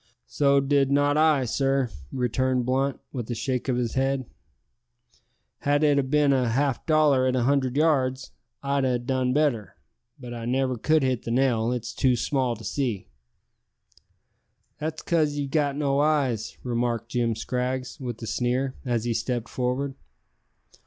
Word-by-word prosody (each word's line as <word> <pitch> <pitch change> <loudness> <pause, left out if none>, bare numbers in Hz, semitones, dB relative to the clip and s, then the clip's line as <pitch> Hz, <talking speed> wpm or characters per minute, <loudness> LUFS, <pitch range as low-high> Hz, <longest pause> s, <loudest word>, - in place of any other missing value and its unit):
"So 140 -1 +3
did 140 0 +2
not 145 +1 +3
I, 155 -4 +3
sir," 135 0 0 0.2
returned 125 0 0
Blunt, 135 +1 0
with 120 -3 -5
a 120 - -2
shake 125 +3 -2
of 125 - +2
his 120 -2 -1
head. 135 0 0 1.3
"Had 145 +1 +1
it 145 -2 +4
a - - +4
bin 140 +1 +2
a 125 -3 +1
half 135 +3 0
dollar 150 -5 +4
at 130 - +1
a 125 - +1
hundred 135 0 +1
yards, 135 -4 +1 0.3
I'd 140 0 0
ha' 125 -2 +2
done 130 -1 0
better, 120 - 0 0.4
but 125 -2 -8
I 115 -1 -6
never 130 +1 0
could 155 +6 +2
hit 130 -3 0
the - - -7
nail. 120 -2 +2
It's 120 -1 -4
too 130 -2 +2
small 125 0 0
to 110 - -12
see." 120 -9 -3 1.7
"That's 155 +1 -4
cos 155 -4 +1
ye've 145 -2 -3
got 145 -2 +1
no 140 -1 +1
eyes," 140 -7 0
remarked 120 -1 -1
Jim 120 -2 0
Scraggs, 125 +4 -3
with 120 -4 -5
a - - -3
sneer, 125 +4 -1
as 120 -4 -1
he 120 -1 0
stepped 115 0 -2
forward. 130 +2 -2
130 Hz, 160 wpm, -25 LUFS, 120-140 Hz, 1.7 s, it